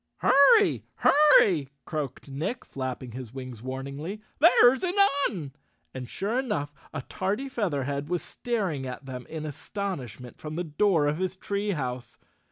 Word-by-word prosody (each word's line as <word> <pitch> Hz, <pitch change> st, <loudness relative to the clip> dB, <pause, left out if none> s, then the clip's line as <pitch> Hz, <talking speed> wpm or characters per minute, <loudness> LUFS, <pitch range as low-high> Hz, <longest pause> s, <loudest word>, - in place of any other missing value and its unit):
"Hurry! 410 Hz, -, +5 dB
Hurry!" 200 Hz, -, +5 dB, 0.2 s
croaked 145 Hz, -6 st, -4 dB
Nick, 160 Hz, -, -4 dB
flapping 130 Hz, -2 st, -5 dB
his 125 Hz, -1 st, -8 dB
wings 130 Hz, -4 st, -7 dB
warningly. 140 Hz, -, -5 dB, 0.2 s
"There's 265 Hz, -5 st, +6 dB
an 365 Hz, 0 st, -1 dB, 0.3 s
Un." 160 Hz, -10 st, -6 dB, 0.4 s
And 125 Hz, -2 st, -6 dB
sure 215 Hz, +6 st, -1 dB
enough, 205 Hz, -, -2 dB, 0.2 s
a 140 Hz, -4 st, -5 dB
tardy 200 Hz, -, -2 dB
Featherhead 145 Hz, -, -2 dB
was 180 Hz, -1 st, -1 dB
staring 190 Hz, -, -2 dB
at 125 Hz, +2 st, -7 dB
them 125 Hz, -2 st, -7 dB
in 160 Hz, -1 st, -6 dB
astonish¬ 155 Hz, -, -5 dB
ment 125 Hz, -1 st, -11 dB
from 155 Hz, 0 st, -6 dB
the 175 Hz, -, -1 dB
door 165 Hz, 0 st, +2 dB
of 150 Hz, +3 st, 0 dB
his 185 Hz, 0 st, -2 dB
tree 200 Hz, +2 st, -2 dB
house. 125 Hz, -5 st, -5 dB
155 Hz, 150 wpm, -27 LUFS, 130-205 Hz, 0.4 s, There's